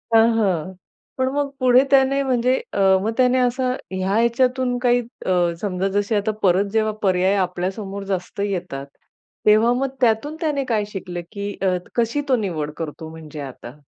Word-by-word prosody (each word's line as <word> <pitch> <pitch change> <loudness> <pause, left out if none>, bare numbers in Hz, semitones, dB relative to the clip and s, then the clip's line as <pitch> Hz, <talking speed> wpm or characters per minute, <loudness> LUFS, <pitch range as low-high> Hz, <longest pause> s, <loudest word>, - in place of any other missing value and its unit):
हां, 225 0 +7
हां. 185 -5 0 0.4
पण 260 0 +1
मग 285 0 0
पुढे 255 0 +5
त्याने 275 0 +4
म्हणजे 255 -1 +2 0.2
अ, - - -1 0.2
मग 215 +3 -1
त्याने 255 0 +4
असं 255 +1 +1 0.2
ह्या 190 +1 -1
ह्याच्यातून 245 +2 +2
काही 245 0 +3 0.2
अ, - - 0 0.3
समजा 190 -2 -1
जसे 205 +2 -1
आता 205 +1 +1
परत 190 +1 +4
जेव्हा 220 -1 +2
पर्याय 190 0 +3
आपल्यासमोर 195 +3 -4
जास्त 185 +1 -5
येतात. 180 -8 -4 0.6
तेव्हा 215 +3 +5
मग 270 +2 -1
त्यातून 240 +6 +2
त्याने 295 -4 0
काय 210 -2 +1
शिकलं? 180 -2 -5
की 200 -1 -4
अ, 185 -2 +2 0.2
कशी 235 +4 +1
तो 260 - +5
निवड 170 -10 -2
करतो 160 0 -6
म्हणजे 160 -2 -9
आता? 130 -1 -9
210 Hz, 165 wpm, -21 LUFS, 185-250 Hz, 0.6 s, हां